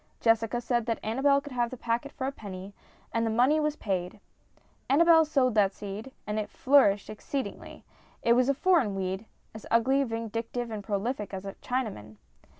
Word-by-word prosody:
Jessica 225 Hz, +1 st, +2 dB
said 240 Hz, -1 st, -1 dB
that 230 Hz, -, 0 dB
Annabel 270 Hz, +6 st, +3 dB
could 290 Hz, -, -10 dB
have 240 Hz, -2 st, 0 dB
the 255 Hz, -, -8 dB
packet 235 Hz, +4 st, -2 dB
for 260 Hz, -, -5 dB
a 270 Hz, -, -1 dB
penny, 195 Hz, -5 st, -9 dB, 0.4 s
and 230 Hz, -, +1 dB
the 225 Hz, -, +1 dB
money 250 Hz, +7 st, +3 dB
was 300 Hz, -1 st, 0 dB
paid. 190 Hz, -5 st, -3 dB, 0.7 s
Annabel 325 Hz, +3 st, +6 dB
sowed 270 Hz, -5 st, +2 dB
that 200 Hz, -2 st, +3 dB
seed, 210 Hz, +5 st, -7 dB
and 210 Hz, +1 st, -2 dB
it 210 Hz, -1 st, -4 dB
flourished 255 Hz, -8 st, +3 dB
exceedingly. 260 Hz, +6 st, -6 dB, 0.4 s
It 235 Hz, -, +5 dB
was 250 Hz, +2 st, +3 dB
a 275 Hz, -, +3 dB
foreign 285 Hz, -, +2 dB
weed 190 Hz, +2 st, -3 dB, 0.3 s
as 220 Hz, -, -10 dB
ugly,, 265 Hz, +4 st, +3 dB
vindictive, 230 Hz, 0 st, -4 dB
and 210 Hz, -2 st, -5 dB
prolific 205 Hz, +1 st, -3 dB
as 190 Hz, +1 st, -7 dB
a 195 Hz, -, -5 dB
Chinaman 205 Hz, -, -4 dB
230 Hz, 175 wpm, -28 LUFS, 205-265 Hz, 0.7 s, Annabel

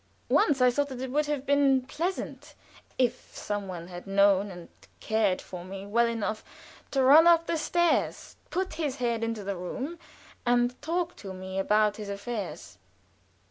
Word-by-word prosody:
Once 280 Hz, -5 st, +3 dB
I 250 Hz, 0 st, +6 dB
thought 285 Hz, +3 st, 0 dB
that 260 Hz, -2 st, -7 dB
it 260 Hz, 0 st, -4 dB
would 295 Hz, +2 st, +1 dB
have 290 Hz, -2 st, -2 dB
been 275 Hz, -2 st, +3 dB
pleasant 335 Hz, +8 st, -4 dB, 0.4 s
if 250 Hz, -1 st, 0 dB
some 205 Hz, -1 st, -3 dB
one 175 Hz, -2 st, -7 dB
had 180 Hz, +1 st, -9 dB
known 200 Hz, 0 st, +4 dB
and 175 Hz, -2 st, -10 dB, 0.3 s
cared 220 Hz, -4 st, +1 dB
for 180 Hz, -2 st, -8 dB
me 195 Hz, +1 st, -8 dB
well 235 Hz, +4 st, +2 dB
enough 220 Hz, -2 st, -2 dB, 0.5 s
to 270 Hz, -2 st, +1 dB
run 300 Hz, +6 st, +8 dB
up 335 Hz, -1 st, +6 dB
the 335 Hz, -, -1 dB
stairs, 345 Hz, +2 st, 0 dB
put 375 Hz, +1 st, -2 dB
his 285 Hz, -4 st, -1 dB
head 235 Hz, -3 st, -1 dB
into 230 Hz, -2 st, -2 dB
the 200 Hz, 0 st, -3 dB
room, 260 Hz, -, -5 dB, 0.4 s
and 245 Hz, +1 st, +1 dB
talk 345 Hz, +3 st, -2 dB
to 190 Hz, -2 st, -8 dB
me 190 Hz, +1 st, -5 dB
about 210 Hz, +1 st, +2 dB
his 210 Hz, -2 st, -6 dB
affairs. 200 Hz, +1 st, -6 dB
235 Hz, 170 wpm, -28 LUFS, 200-285 Hz, 0.5 s, run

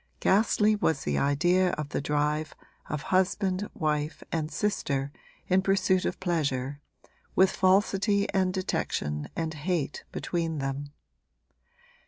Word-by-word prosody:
Ghastly 210 Hz, +1 st, +3 dB
was 160 Hz, -6 st, 0 dB
the 70 Hz, -1 st, 0 dB
idea 175 Hz, +6 st, +2 dB
of 150 Hz, -1 st, -3 dB
the -, -, -2 dB
drive 150 Hz, +1 st, -1 dB, 0.3 s
of 150 Hz, -2 st, -3 dB
husband, 190 Hz, +1 st, +1 dB
wife 150 Hz, -5 st, -1 dB
and 155 Hz, -2 st, -1 dB
sister 140 Hz, -10 st, -1 dB, 0.4 s
in 185 Hz, +1 st, +3 dB
pursuit 190 Hz, -1 st, +2 dB
of -, -, -2 dB
pleasure, 145 Hz, -6 st, -1 dB, 0.5 s
with 190 Hz, 0 st, +5 dB
falsity 200 Hz, +2 st, +2 dB
and 190 Hz, -2 st, +2 dB
detection 75 Hz, -, -2 dB
and 160 Hz, -1 st, -2 dB
hate 155 Hz, -1 st, -2 dB
between 165 Hz, -2 st, -2 dB
them. 140 Hz, +1 st, -3 dB
165 Hz, 120 wpm, -28 LUFS, 145-190 Hz, 0.5 s, with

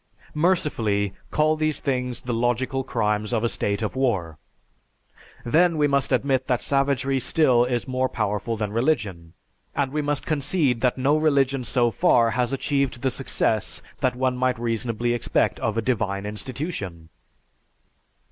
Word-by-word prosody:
Mercifully, 115 Hz, -, +1 dB, 0.2 s
call 155 Hz, +1 st, +2 dB
these 155 Hz, -1 st, 0 dB
things 125 Hz, -3 st, -2 dB
the 125 Hz, -, -3 dB
logical 125 Hz, +3 st, 0 dB
crimes 105 Hz, -3 st, -1 dB
of 115 Hz, -2 st, 0 dB
a 115 Hz, -, +2 dB
state 100 Hz, 0 st, -1 dB
of 105 Hz, -, -3 dB
war! 95 Hz, -, -1 dB, 1.1 s
Then 165 Hz, +6 st, +3 dB
we 150 Hz, -, +3 dB
must 140 Hz, -2 st, +1 dB
admit 130 Hz, -2 st, +1 dB
that 125 Hz, -2 st, 0 dB
savagery 135 Hz, -1 st, +1 dB
still 130 Hz, -2 st, +3 dB
is 125 Hz, 0 st, -2 dB
more 130 Hz, 0 st, 0 dB
powerful 105 Hz, +1 st, -2 dB
than 105 Hz, -1 st, -3 dB
religion, 105 Hz, -, -1 dB, 0.4 s
and 140 Hz, -2 st, 0 dB
we 150 Hz, +1 st, -1 dB
must 145 Hz, -1 st, -2 dB
concede 145 Hz, -4 st, +1 dB
that 125 Hz, -1 st, +1 dB
no 135 Hz, +3 st, +2 dB
religion 140 Hz, -4 st, +2 dB
so 120 Hz, -1 st, +1 dB
far 120 Hz, -7 st, +3 dB
has 125 Hz, +1 st, 0 dB
achieved 140 Hz, -2 st, -1 dB
the 130 Hz, -, +2 dB
success 115 Hz, -4 st, -1 dB, 0.2 s
that 125 Hz, -1 st, +1 dB
one 130 Hz, 0 st, 0 dB
might 130 Hz, 0 st, 0 dB
reasonably 115 Hz, 0 st, -1 dB
expect 120 Hz, -, 0 dB
of 110 Hz, 0 st, -1 dB
a 115 Hz, -, 0 dB
divine 100 Hz, -5 st, -1 dB
institution." 105 Hz, -, -5 dB
125 Hz, 150 wpm, -24 LUFS, 115-140 Hz, 1.1 s, Then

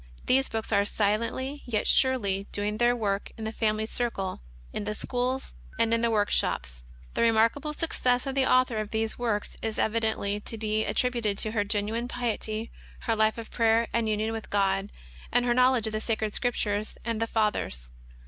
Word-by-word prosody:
These 265 Hz, +1 st, +3 dB
books 225 Hz, 0 st, -3 dB
are 200 Hz, -2 st, +4 dB
silently, 230 Hz, +7 st, -1 dB
yet 220 Hz, -4 st, -1 dB
surely, 205 Hz, -7 st, +3 dB
doing 210 Hz, +1 st, -1 dB
their 240 Hz, 0 st, +4 dB
work 200 Hz, -4 st, -1 dB
in 220 Hz, -, -6 dB
the 220 Hz, -, -2 dB
family 220 Hz, -1 st, 0 dB
circle, 220 Hz, -, -3 dB, 0.3 s
in -, -, -3 dB
the 210 Hz, +1 st, -2 dB
schools, 250 Hz, +3 st, -2 dB, 0.2 s
and 230 Hz, 0 st, +2 dB
in 230 Hz, -, +2 dB
the 235 Hz, -, +3 dB
work 210 Hz, -2 st, +1 dB
shops. -, -, 0 dB, 0.3 s
The -, -, -1 dB
remarkable 230 Hz, +6 st, +3 dB
suc 320 Hz, +2 st, -3 dB
cess 250 Hz, +1 st, +2 dB
of 270 Hz, -, -2 dB
the 265 Hz, -1 st, +2 dB
Author 255 Hz, -3 st, +3 dB
of 215 Hz, -1 st, -2 dB
these 220 Hz, +1 st, -2 dB
works 225 Hz, -4 st, -2 dB
is 220 Hz, -1 st, -3 dB
evidently 220 Hz, -2 st, 0 dB
to 225 Hz, +2 st, -5 dB
be 215 Hz, 0 st, 0 dB
at -, -, -2 dB
tributed 235 Hz, -5 st, +1 dB
to 215 Hz, -, 0 dB
her 210 Hz, -2 st, +1 dB
genuine 210 Hz, +3 st, -1 dB
piety, 230 Hz, -2 st, -3 dB, 0.3 s
her 225 Hz, -, 0 dB
life 220 Hz, 0 st, +2 dB
of 230 Hz, -1 st, -7 dB
prayer 230 Hz, 0 st, +3 dB
and 230 Hz, -1 st, +1 dB
union 215 Hz, +1 st, 0 dB
with 225 Hz, -1 st, -6 dB
God, 195 Hz, 0 st, +1 dB, 0.4 s
and 245 Hz, 0 st, +3 dB
her 240 Hz, -, +3 dB
knowledge 250 Hz, -2 st, +4 dB
of 220 Hz, -, -2 dB
the 215 Hz, -, -1 dB
Sacred 220 Hz, -2 st, -1 dB
Scrip 245 Hz, -1 st, 0 dB
tures 210 Hz, 0 st, -1 dB
and 230 Hz, -1 st, -1 dB
the 225 Hz, -, +1 dB
Fathers. 210 Hz, -, -1 dB
220 Hz, 195 wpm, -28 LUFS, 210-240 Hz, 0.4 s, are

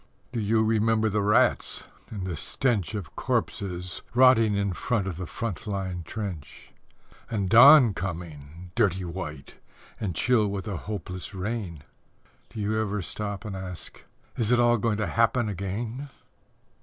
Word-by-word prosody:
Do 120 Hz, -, -2 dB
you 110 Hz, +1 st, +2 dB
remember 110 Hz, 0 st, +2 dB
the 105 Hz, +1 st, 0 dB
rats; 105 Hz, +1 st, +2 dB, 0.3 s
and 100 Hz, -4 st, -5 dB
the 90 Hz, -3 st, -3 dB
stench 110 Hz, -, 0 dB
Of 95 Hz, -8 st, -6 dB
corpses 90 Hz, -2 st, -2 dB
rotting 120 Hz, -4 st, +6 dB
in 100 Hz, -1 st, 0 dB
front 105 Hz, +1 st, -1 dB
of 95 Hz, -4 st, -4 dB
the 90 Hz, -2 st, -5 dB
front 115 Hz, +1 st, -5 dB
line 95 Hz, -3 st, -3 dB
trench, 90 Hz, -11 st, -7 dB, 0.6 s
And 105 Hz, -5 st, -1 dB
dawn 125 Hz, +2 st, +8 dB
coming, 85 Hz, -2 st, -7 dB
dirty 95 Hz, -5 st, +1 dB
white, 85 Hz, -3 st, -7 dB, 0.4 s
and 95 Hz, -6 st, -3 dB
chill 115 Hz, +1 st, +3 dB
with 100 Hz, 0 st, -4 dB
a 100 Hz, -, -3 dB
hopeless 95 Hz, 0 st, -6 dB
rain? 95 Hz, -6 st, -4 dB, 0.7 s
Do -, -, -8 dB
you 110 Hz, +1 st, 0 dB
ever 105 Hz, -2 st, -2 dB
stop 100 Hz, +2 st, -5 dB
and 100 Hz, -3 st, -5 dB
ask, 95 Hz, -2 st, -8 dB, 0.3 s
"Is 115 Hz, -3 st, 0 dB
it 120 Hz, 0 st, +4 dB
all 120 Hz, -1 st, +4 dB
going 105 Hz, 0 st, 0 dB
to 110 Hz, -, 0 dB
happen 115 Hz, +6 st, +2 dB
again?" 110 Hz, +8 st, -4 dB
100 Hz, 150 wpm, -26 LUFS, 90-110 Hz, 0.7 s, dawn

